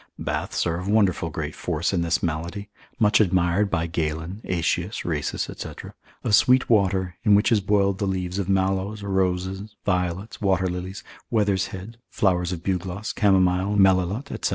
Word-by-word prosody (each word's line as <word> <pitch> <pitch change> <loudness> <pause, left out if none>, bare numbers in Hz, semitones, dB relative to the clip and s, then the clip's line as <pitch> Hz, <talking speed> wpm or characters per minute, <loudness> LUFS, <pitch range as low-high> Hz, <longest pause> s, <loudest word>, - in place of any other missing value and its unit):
Baths - - -2
are 85 0 -1
of 90 - -6
wonderful 100 -5 +2
great 75 -1 -4
force 85 +2 -2
in 90 - +1
this 85 +1 0
malady, 85 +5 -3 0.3
much 105 -2 +4
admired 95 +1 +2
by 85 -3 0
Galen, 80 +4 -3
Aetius, 90 +3 -1
Rhasis, 75 -4 -1
&c., - - -6 0.5
of - - -1
sweet 125 +5 +5
water, 95 -4 +2
in 105 - +5
which 105 - +3
is 110 -3 +4
boiled 100 -1 +1
the 100 - 0
leaves 95 0 -2
of 100 -1 -2
mallows, 95 +2 0
roses, 95 +1 -1
violets, 90 +3 -2
water 95 -2 +2
lilies, 90 +3 -5 0.3
wether's 100 -4 +1
head, 100 +5 -9
flowers 90 -3 +1
of 85 -2 -5
bugloss, 95 +2 -3
camomile, 95 -1 +2
melilot, 95 +5 +2
&c. - - +2
95 Hz, 160 wpm, -24 LUFS, 90-100 Hz, 0.5 s, sweet